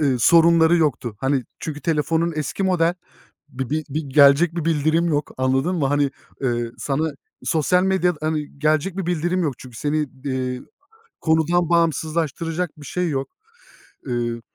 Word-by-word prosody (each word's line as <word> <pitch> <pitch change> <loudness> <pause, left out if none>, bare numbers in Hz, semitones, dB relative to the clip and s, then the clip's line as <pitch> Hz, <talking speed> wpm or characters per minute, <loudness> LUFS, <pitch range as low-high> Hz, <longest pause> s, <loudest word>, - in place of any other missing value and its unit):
ııı, 135 -4 +2
sorunları 165 +4 +5
yoktu. 130 -9 0
Hani, 135 -2 0
çünkü 150 -2 -6
telefonun 165 +1 0
eski 155 +6 -3
model. 175 -2 +2 0.5
Bir 130 -2 -5
bir 155 +1 -1
bir 150 +3 -2
gelecek 150 +3 +6
bir 170 -3 -3
bildirim 165 +1 +2
yok. 150 -2 -1
Anladın 135 +7 +1
mı? 145 - +1
Hani, 145 0 +1 0.3
ııı, 120 -2 -1
sana 150 +3 -1 0.4
sosyal 170 +3 +2
medyada, 185 -3 +1
hani, 150 -2 -3
gelecek 155 +5 +1
bir 190 -3 -3
bildirim 175 +1 0
yok 145 -5 -1
çünkü 125 -3 -12
seni, 150 +1 -1 0.2
eee, 130 -2 -2 0.6
konudan 160 +2 +2
bağımsızlaştıracak 165 0 0
bir 145 - -11
şey 180 +3 -1
yok. 135 -1 -2 0.8
Iıı, 120 -2 -2
155 Hz, 150 wpm, -22 LUFS, 140-170 Hz, 0.8 s, gelecek